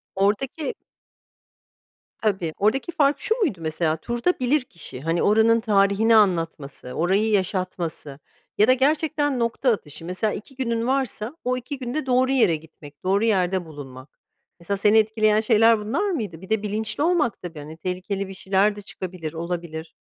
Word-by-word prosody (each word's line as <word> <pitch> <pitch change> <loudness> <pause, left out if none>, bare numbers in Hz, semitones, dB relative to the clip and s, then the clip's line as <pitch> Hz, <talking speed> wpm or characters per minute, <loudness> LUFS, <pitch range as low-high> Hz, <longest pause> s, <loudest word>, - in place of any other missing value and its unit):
Oradaki 210 +10 0 1.4
Tabii, 190 -7 -1
oradaki 230 +11 +1
fark 295 -4 +2
şu 445 - +1
muydu 345 - -1
mesela? 160 0 -1
Turda 240 - 0
bilirkişi, 250 - -2
hani, 165 +3 0
oranın 225 +2 +4
tarihini 210 0 +3
anlatması, 165 -10 0
orayı 195 +6 +2
yaşatması 180 -7 -2 0.4
ya 210 - +5
da 255 - +7
gerçekten 290 0 +1
nokta 235 +3 0
atışı. 165 -6 -5
Mesela 185 +5 -1
2 265 +6 -9
günün 235 -3 -1
varsa, 260 -2 -2
o 255 +1 0
2 260 +3 -6
günde 260 +3 -3
doğru 260 0 +2
yere 225 -11 +4
gitmek, 150 -2 -13
doğru 195 +4 +2
yerde 185 -4 +1
bulunmak. 135 -4 -10 0.5
Mesela 175 +4 -2
seni 210 +2 +4
etkileyen 215 -1 +3
şeyler 225 0 +4
bunlar 260 - -1
mıydı? 210 - -4
Bir 190 - -12
de 220 -1 +1
bilinçli 215 +4 -1
olmak 320 - +1
tabii, 170 -4 -7
hani, 155 +2 -9
tehlikeli 185 +3 -3
bir 195 - -8
şeyler 195 +2 +1
de 205 - -8
çıkabilir, 180 -5 -6
olabilir. 170 -1 -5
210 Hz, 155 wpm, -23 LUFS, 175-240 Hz, 1.4 s, da